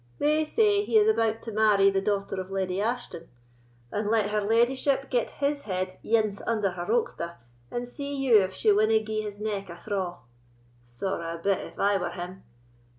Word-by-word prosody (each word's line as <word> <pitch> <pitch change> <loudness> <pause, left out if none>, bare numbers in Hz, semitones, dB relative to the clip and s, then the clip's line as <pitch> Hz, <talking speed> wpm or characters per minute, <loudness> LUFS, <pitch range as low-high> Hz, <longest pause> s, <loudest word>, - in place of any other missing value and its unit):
"They 305 +1 +2
say 410 +4 +3
he 440 - +2
is 425 0 +5
about 225 - +1
to 230 - -5
marry 205 -2 +4
the 195 0 0
daughter 195 -1 -1
of 185 - -9
Leddy 190 0 -1
Ashton; 225 -7 -3 0.6
and 210 0 -1
let 215 -2 +2
her 210 0 +1
leddyship 255 +6 +1
get 245 -3 +1
his 285 0 -1
head 185 -3 -3
ance 215 -3 +1
under 215 -4 +1
her 175 -1 -6
oxter, 170 -7 -1 0.3
and 240 0 -4
see 280 +3 -5
you 255 -6 +5
if 190 0 -1
she 210 +3 +2
winna 215 +2 +4
gie 215 0 -2
his 205 -1 -7
neck 205 -3 -3
a 170 - -8
thraw. 185 -2 -3 0.7
Sorra 165 +7 -4
a - - -6
bit, 195 -1 +2
if - - -10
I 200 0 +3
were 180 - -2
him! 180 +1 -7
210 Hz, 190 wpm, -27 LUFS, 190-240 Hz, 0.7 s, is